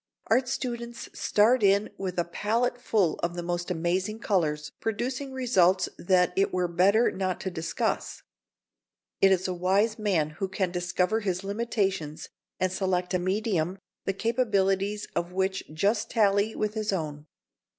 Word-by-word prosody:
Art 250 +3 +4
students 235 -2 -4
start 225 +4 +3
in 200 +1 +3
with 185 -2 -4
a 175 - +3
palette 230 +7 -1
full 200 -9 +1
of 170 0 -1
the 175 - -4
most 175 0 -2
amazing 180 +5 -1
colours, 155 -9 0
producing 255 +5 -3
results 190 -8 +3
that 180 0 +3
it 195 +1 +2
were 180 -1 0
better 195 +7 +3
not 185 -1 -2
to 190 - -3
discuss. 165 -1 -2 1.0
It 195 - +6
is 185 0 +2
a 185 - -1
wise 195 +5 +1
man 175 -8 +1
who 195 - +1
can 190 -1 -1
discover 180 +4 0
his 190 -3 -2
limitations 195 -7 -2 0.3
and 185 -1 +1
select 185 -1 -1
a 180 - +2
medium 185 -2 0 0.3
the 195 - 0
capacities 205 -3 0
of 175 +1 -2
which 190 +1 -1
just 205 +8 0
tally 205 -1 +2
with 215 0 -1
his 215 -1 -1
own. 155 -5 -4
195 Hz, 150 wpm, -27 LUFS, 180-215 Hz, 1.0 s, It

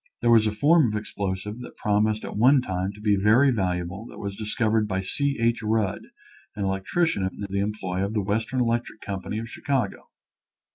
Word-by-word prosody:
There 120 - +3
was 110 -2 +6
a - - +1
form 145 +7 +4
of 105 - -2
explosive 100 +1 -4
that 125 - -10
promised 105 0 +1
at - - -6
one 130 +5 +5
time 95 -2 -2
to 105 - -14
be 105 -1 +2
very 110 +8 +4
valuable 90 0 -2
that - - -12
was 100 -1 -5
dis 105 0 -5
covered 110 -2 +2
by 95 -2 -1
C. 140 +9 -1
H. 115 0 +1
Rudd, 110 -2 -1 0.5
an 100 - -2
electrician 95 - 0
in 95 +2 -3
the 100 0 -2
employ 100 -3 -2
of 100 +3 -3
the 105 - +1
Western 110 +5 -1
Electric 120 -2 -1
Company 100 +1 -4
of 115 +1 -4
Chicago. 135 +2 -2
105 Hz, 195 wpm, -25 LUFS, 100-115 Hz, 0.5 s, was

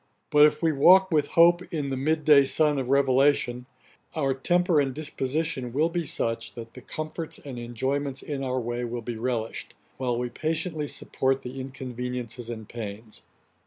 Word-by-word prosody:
But 150 0 +8
if 150 +2 -4
we 165 - +4
walk 185 +6 +6
with 150 -3 +2
hope 175 +1 +7
in 150 -4 -2
'the 135 - -2
mid 155 +3 0
day 145 -3 +7
sun' 150 0 +2
of 130 -2 -3
revelation, 135 -2 +3 0.5
our 140 -4 +1
temper 175 +3 +2
and 135 -2 -2
disposition 140 -3 -2
will 155 +5 +2
be 170 -2 -3
such, 115 -2 -2
that 115 -1 -9
the 130 - -11
comforts 155 +4 -5
and 130 -4 -8
enjoyments 135 +4 -2
in 140 -2 -4
our 130 -1 -1
way 120 0 -3
will 120 0 -4
be 120 0 -5
relished, 115 -1 -3 0.2
while 125 -2 -1
we 125 0 -2
patiently 155 +1 -2
support 135 -1 -1
the 125 +2 -7
inconveniences 125 -2 -6
and 110 -3 -6
pains. 110 -1 -8
135 Hz, 170 wpm, -26 LUFS, 120-150 Hz, 0.5 s, But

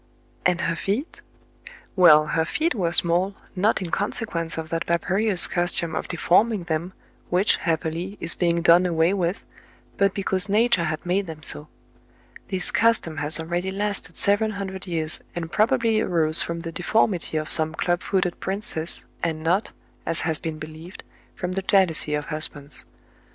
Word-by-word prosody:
And 180 0 0
her 170 - -1
feet? 210 - -3 0.7
Well, 155 -5 +6
her 160 +1 0
feet 315 - -1
were 180 -7 -1
small, 175 +3 +2 0.2
not 200 +2 +1
in 170 - -6
consequence 175 -5 -2
of 160 -1 -5
that 165 0 -3
barbarotis 185 +3 +4
custom 175 -1 -1
of - - -3
de 175 - -5
forming 205 +4 +2
them, 170 +2 -3 0.4
which, 185 +4 +2
happily, 165 +4 -3
is 165 - +7
being 170 -1 0
done 175 +2 +5
away 165 +1 +2
with, 180 -1 -2 0.5
but 200 -1 +2
because 195 0 -1
nature 210 -4 +2
had 155 +1 -4
made 190 +2 0
them 160 -1 -9
so. 150 -1 -1 0.8
This 185 -2 +3
custom 225 -9 +1
has 150 +2 +1
already 175 +3 -3
lasted 200 -3 -4
seven 205 +2 +2
hundred 195 -2 -6
years, 160 -3 -2 0.2
and 165 -1 -5
probably 225 -1 +2
arose 160 -4 +4
from 170 0 -4
the 165 0 -6
deformity 175 -1 0
of 155 0 -3
some 160 0 +1
club 175 0 -1
footed 185 -3 -1
princess, 190 -4 -3 0.2
and 160 -2 -2
not, 185 +6 +1 0.4
as 165 - +1
has 160 -2 0
been 160 -1 -5
believed, 155 +4 -10 0.3
from 180 -1 -4
the 195 +1 -2
jealousy 180 -6 +2
of 150 0 -3
husbands. 150 -2 -2
175 Hz, 160 wpm, -23 LUFS, 160-195 Hz, 0.8 s, is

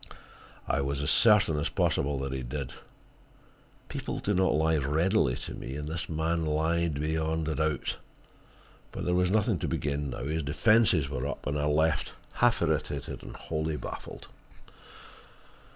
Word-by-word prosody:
I 70 - +1
was 70 +1 -2
as 75 - +3
certain 105 -9 +5
as 75 0 -1
possible 70 0 +1
that 70 0 -3
he 65 - -3
did. 65 +1 -5 1.1
People - - -4
do 105 - -1
not 95 -4 +3
lie 80 +1 +2
readily 75 - +2
to 65 - -7
me, 65 - -6
and 75 0 -4
this 80 +2 -3
man 80 +1 0
lied 80 +1 +1
beyond 80 +1 -1
a 80 - 0
doubt. 80 -2 -1 0.9
But - - -5
there 90 - +1
was 90 0 +2
nothing 105 -2 +2
to - - -2
be - - -1
gained 70 0 -2
now; - - -5
his 80 +4 -1
defenses 80 +1 +3
were 70 -1 -3
up, 70 - -6
and 75 - -1
I 75 0 0
left, 80 +2 +1 0.2
half - - +3
irritated - - -2
and - - -9
wholly 80 -1 -3
baffled. - - -8
80 Hz, 165 wpm, -29 LUFS, 70-80 Hz, 1.1 s, certain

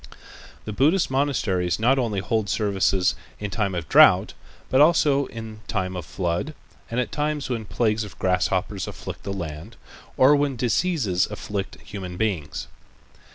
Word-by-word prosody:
The 105 - -4
Buddhist 155 - +2
monasteries 110 -11 0
not 125 +5 +3
only 110 -6 -1
hold 110 +1 -1
services 95 -2 +1 0.3
in 105 -1 -4
time 100 -2 -1
of 85 -4 -4
drought, - - +6 0.4
but 130 - +5
also 145 -3 +4
in 110 -1 -8
time 95 -3 -2
of 90 -4 -6
flood 90 - -2 0.3
and 115 - -1
at 125 - -1
times 150 -2 -2
when 115 -3 -2
plagues 110 0 0
of 100 -4 -10
grasshoppers 95 +1 0
afflict - - -7
the 100 - -5
land, 85 +2 -6 0.4
or 135 +3 +6
when 145 -2 0
diseases 120 - +1
afflict 105 -1 -5
human 90 -3 -7
beings. 90 -10 -2
105 Hz, 150 wpm, -24 LUFS, 95-130 Hz, 0.4 s, drought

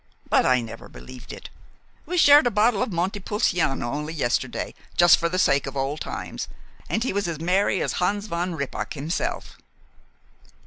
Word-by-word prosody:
But - - +4
I 125 -1 +3
never 115 - -9
believed 65 - -11
it. - - -10 0.6
We 360 - -2
shared 290 -4 +7
a - - +3
bottle 215 0 +2
of - - -1
Monte 185 +4 -1
Pulciano 180 - 0
only 150 +2 -4
yesterday, 120 -6 -1 0.2
just 175 -1 +7
for 170 - 0
the 180 - -2
sake 140 -6 +2
of 135 0 -6
old 135 +3 -2
times, - - -5 0.4
and 220 - 0
he 255 - -1
was 200 -2 -1
as 165 -3 -4
merry 185 +3 +1
as - - -2
Hans 200 +3 0
von 175 -2 -3
Rippach 140 +1 -4
himself." 150 +4 -4
175 Hz, 175 wpm, -24 LUFS, 140-205 Hz, 0.6 s, shared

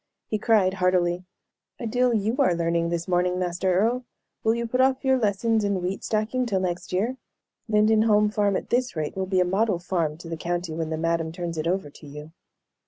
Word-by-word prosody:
He 215 - -2
cried, 205 -4 +3
heartily: 180 -1 +1 0.5
"A 235 - -5
deal 245 +2 +2
you 220 +1 0
are 255 -11 +3
learning 170 0 0
this 170 -1 -3
morning, 180 0 +1
Master 180 +1 -1
Earle. 230 +7 +1 0.4
Will 225 +1 +3
you 235 0 -2
put 250 +3 +1
off 265 +1 +2
your 265 -1 +3
lessons 220 +1 +1
in 200 -2 0
wheat 180 +2 -3
stacking 225 +4 -1
till 195 -4 0
next 180 -1 -3
year? 220 +8 0 0.5
Lindenholm 215 0 +4
farm, 205 -2 +1
at - - -4
this 250 -2 +1
rate, 155 -2 -3
will 190 0 -2
be 185 -1 +2
a - - +3
model 195 +1 +1
farm 170 -4 -2
to 170 - -11
the 165 0 -4
county 175 0 -3
when 160 0 -3
the 160 - -2
madam 165 0 -1
turns 170 0 -5
it 155 +1 -2
over 180 -4 -1
to 150 - -14
you." 150 +2 -10
185 Hz, 210 wpm, -25 LUFS, 170-220 Hz, 0.5 s, Lindenholm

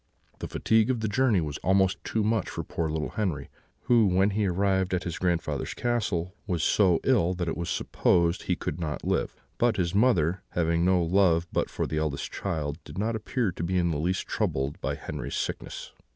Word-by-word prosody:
The - - -4
fatigue 110 +1 +2
of 125 -3 0
the 110 - 0
journey 110 -3 +2
was 75 -3 -4
almost 95 +1 +2
too 110 - -1
much 110 -2 0
for - - -4
poor 80 -1 -3
little 75 0 -2
Henri, 90 - -2 0.3
who, 115 -4 +4
when 95 +2 +3
he 105 0 +1
arrived 95 0 +1
at 90 - -2
his 85 -2 -4
grandfather's 85 -2 -1
castle, 105 -7 -1
was 85 -5 -1
so 90 -2 +4
ill 95 -9 +2
that 90 -1 -3
it 80 - -1
was 85 0 -4
supposed 85 +1 +1
he - - 0
could - - -4
not 80 -3 -3
live; - - 0 0.2
but 120 -2 +2
his 85 -3 0
mother, 95 -6 +3
having 85 0 +1
no 90 -1 +3
love 85 -1 +3
but - - 0
for - - -2
the 80 - -2
eldest 75 -3 -2
child, 80 -4 -3
did - - -10
not 110 +3 0
appear 110 0 -1
to 80 - -8
be 90 +2 0
in 85 -1 +2
the 75 - -2
least 90 +4 -1
troubled 70 +2 -2
by - - -1
Henri's - - -5
sickness. - - -4
90 Hz, 205 wpm, -27 LUFS, 85-105 Hz, 0.3 s, who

